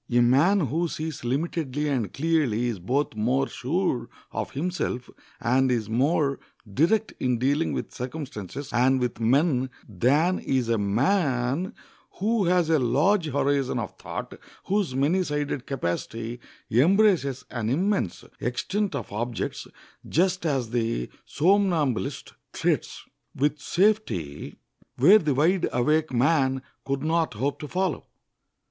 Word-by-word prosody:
A 120 - +4
man 140 +12 +4
who 160 +4 0
sees 160 -2 -5
limitedly 145 +2 -2
and 125 -9 -1
clearly 140 -7 +1
is 110 -5 -4
both 130 +11 -1
more 125 +6 +1
sure 150 -2 -1 0.2
of - - -3
himself 145 -5 -3 0.3
and 130 +2 +2
is 110 -3 -1
more 140 +3 +1 0.3
direct 205 - +2
in 125 -2 +1
dealing 145 +6 +1
with - - -4
circumstances 135 - -6
and 130 +2 +3
with 125 -2 -2
men 130 +2 +2 0.2
than 140 - +2
is 130 -3 -1
a 115 -2 +2
man 135 - +1 0.4
who 215 +1 +1
has 175 -1 +3
a 160 - +4
large 155 - +2
horizon 140 -2 0
of 110 -6 -4
thought, - - -6 0.3
whose 195 -9 0
many 150 +8 +2
sided 145 -5 -2
capacity 115 0 -3 0.3
embraces 165 - +3
an 115 -3 -2
immense 175 - 0 0.2
extent 190 - -1
of - - -5
objects, 115 +2 -3 0.4
just 180 +1 +1
as 130 -6 -1
the 115 - -1 0.2
somnambulist 170 - +1 0.2
treads - - -1 0.3
with 145 +2 0
safety 170 - 0 0.4
where 185 - +7
the 150 -6 0
wide 170 +6 +2
awake 150 +5 +1
man 130 0 +2 0.2
could 135 0 -2
not 160 -4 0
hope 135 +6 -2
to 150 - -6
follow. 185 +4 -2
140 Hz, 130 wpm, -26 LUFS, 125-165 Hz, 0.4 s, where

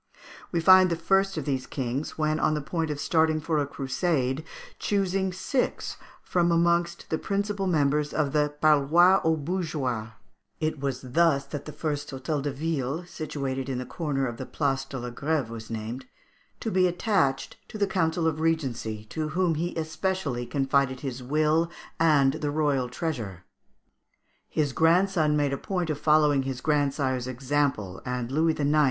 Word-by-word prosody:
We 170 - +1
find 185 +2 +7
the 170 - +1
first 195 +3 +1
of 150 - -3
these 135 -3 -2
kings, 130 +2 -3
when 155 0 +1
on 155 - +2
the - - -1
point 160 +2 -2
of 150 -1 -3
starting 160 0 +2
for 155 0 0
a 145 - 0
crusade, 135 0 -1 0.4
choosing 195 -1 0
six 250 +8 -2 0.3
from 175 -1 +1
amongst 170 0 +1
the 160 - 0
principal 200 0 -1
members 150 -3 +2
of 145 -3 0
the 150 -1 +2
parloir 155 +5 +5
aux 160 0 +3
bourgeois 145 -9 -2 0.5
(it 155 -2 -1
was 135 -1 -2
thus 140 +1 +2
that 145 0 -6
the 150 - -6
first 145 -1 -3
Hôtel 140 +3 -2
de 145 +1 -2
Ville, 150 +2 -2
situated 140 -6 -4
in 130 - -2
the 125 - -4
corner 145 -4 -2
of 120 -2 -4
the - - -5
Place 135 -2 -1
de 135 - -7
la 120 -1 -5
Grève, 140 -1 -1
was 115 -1 -8
named) 115 +3 -5 0.5
to 225 - -3
be 185 -1 +4
attached 175 -7 0
to - - -8
the 205 - +2
Council 170 -3 0
of 160 -1 0
Regency, 130 -10 -1
to 155 -1 -2
whom 175 +1 +1
he 170 +3 -2
specially 160 -7 -2
confided 135 -2 +1
his 130 -3 -4
will 155 +5 +2 0.3
and 145 -5 +4
the 150 - 0
royal 145 -4 +1
treasure. 120 - -4 1.1
His 145 -4 0
grandson 165 0 +3
made 145 -2 +1
a 140 - -3
point 180 -4 -2
of 150 - -3
following 150 -3 +4
his 135 -1 -4
grandsire's 140 -4 0
example, 130 -7 -1
and 125 -1 -3
Louis 160 +2 +1
IX. 145 +1 +3
150 Hz, 170 wpm, -27 LUFS, 135-165 Hz, 1.1 s, find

